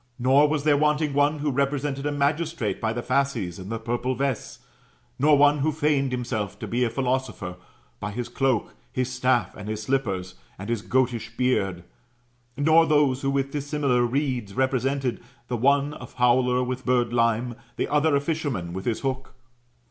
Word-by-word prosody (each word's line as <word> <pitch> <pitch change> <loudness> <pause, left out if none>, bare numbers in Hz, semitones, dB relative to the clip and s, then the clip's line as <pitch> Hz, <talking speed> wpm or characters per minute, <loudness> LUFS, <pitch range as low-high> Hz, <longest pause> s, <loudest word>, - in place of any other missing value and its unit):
Nor 135 +4 +4
was 150 -1 -1
there 145 -1 +4
wanting 150 0 +1
one 145 +2 +2
who 145 -1 -1
repre 140 +1 +1
sented 140 0 -3
a 145 - 0
magistrate 145 - -1
by 110 - 0
the 120 +1 -4
fasces 120 -11 -1
and 95 +3 -8
the 115 - -1
purple 120 +3 -2
vest; 135 -2 -3 0.6
nor 145 +2 +5
one 145 +1 +5
who 155 +3 +1
feigned 145 -3 +1
himself 120 -5 -3
to - - -6
be 120 +2 0
a 120 - +1
philosopher, 125 -7 -2 0.4
by 105 - -4
his 120 +3 -4
cloak, 125 -2 0 0.2
his 130 0 -2
staff, 125 -1 +1
and 105 0 -7
his 110 0 -3
slippers, 100 -8 -1 0.2
and 100 +5 -5
his 115 -3 -1
goatish 120 -2 -1
beard; 95 -9 0 0.7
nor 160 +3 +5
those 145 -4 +3
who 135 - 0
with 135 0 0
dis 145 -1 -4
similar 140 -4 +1
reeds 125 -5 -1
represented, 130 0 0 0.3
the 125 - -1
one 140 +4 +2
a 125 - -8
fowler 125 +1 +2
with 130 0 -4
birdlime, 120 -1 +1
and - - -9 0.2
the - - -1
other 150 0 +2
a - - +4
fisherman 140 - -3
with 95 +1 -5
his 115 -2 -1
hook. 135 -1 -3
130 Hz, 180 wpm, -25 LUFS, 120-140 Hz, 0.7 s, nor